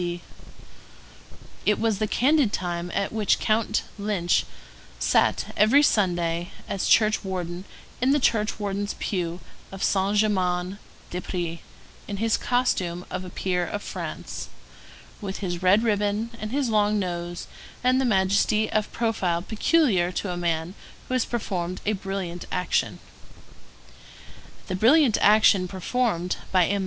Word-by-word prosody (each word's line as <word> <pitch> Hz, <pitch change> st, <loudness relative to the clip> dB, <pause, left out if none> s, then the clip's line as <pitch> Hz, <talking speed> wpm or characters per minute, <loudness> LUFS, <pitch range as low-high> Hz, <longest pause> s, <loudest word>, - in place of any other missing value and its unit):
It 210 Hz, -, +2 dB
was 220 Hz, -3 st, +1 dB
the 215 Hz, -, 0 dB
candid 270 Hz, 0 st, +3 dB
time 175 Hz, -2 st, -3 dB
at 200 Hz, +1 st, -1 dB
which 215 Hz, -2 st, +2 dB
Count 220 Hz, +1 st, +1 dB, 0.2 s
Lynch 200 Hz, -4 st, +1 dB, 0.5 s
sat -, -, +1 dB
every 250 Hz, +8 st, +5 dB
Sunday 175 Hz, -, +1 dB, 0.2 s
as 195 Hz, -, -2 dB
church 215 Hz, -1 st, +4 dB
warden 180 Hz, -1 st, -4 dB, 0.4 s
in 255 Hz, -, +3 dB
the 290 Hz, +2 st, +4 dB
church 215 Hz, -4 st, +1 dB
warden's 205 Hz, 0 st, -2 dB
pew 175 Hz, -3 st, -3 dB, 0.3 s
of 195 Hz, 0 st, -6 dB
Saint 195 Hz, +1 st, +1 dB
Germain 185 Hz, -2 st, +1 dB, 0.3 s
des 180 Hz, -, -3 dB
Prés, 170 Hz, -3 st, -4 dB, 0.5 s
in 200 Hz, -, -4 dB
his 225 Hz, +2 st, +2 dB
costume 185 Hz, -8 st, 0 dB
of -, -, -3 dB
a 185 Hz, -, -7 dB
peer 180 Hz, 0 st, -1 dB
of 205 Hz, +4 st, -4 dB
France, -, -, -6 dB, 0.7 s
with 195 Hz, -2 st, -4 dB
his 175 Hz, -3 st, -4 dB
red 190 Hz, +4 st, +4 dB
ribbon 210 Hz, +1 st, 0 dB
and 215 Hz, 0 st, -5 dB
his 275 Hz, 0 st, 0 dB
long 210 Hz, -1 st, +2 dB
nose 175 Hz, -2 st, -3 dB, 0.4 s
and 255 Hz, +1 st, +3 dB
the -, -, +1 dB
majesty 210 Hz, 0 st, +2 dB
of 215 Hz, -1 st, 0 dB
profile 190 Hz, -7 st, 0 dB
peculiar 220 Hz, -, +2 dB
to 185 Hz, 0 st, -2 dB
a -, -, -3 dB
man 170 Hz, 0 st, -1 dB, 0.4 s
who -, -, -2 dB
has 255 Hz, -2 st, +2 dB
performed 185 Hz, -6 st, -3 dB
a 215 Hz, -, +2 dB
brilliant 190 Hz, -3 st, -4 dB
action. 180 Hz, 0 st, 0 dB, 1.7 s
The 190 Hz, -, -4 dB
brilliant 240 Hz, -, +4 dB
action 205 Hz, -3 st, +5 dB
performed 190 Hz, -1 st, -1 dB
by 185 Hz, -2 st, +4 dB
M. 200 Hz, +3 st, 0 dB
200 Hz, 140 wpm, -25 LUFS, 180-220 Hz, 1.7 s, every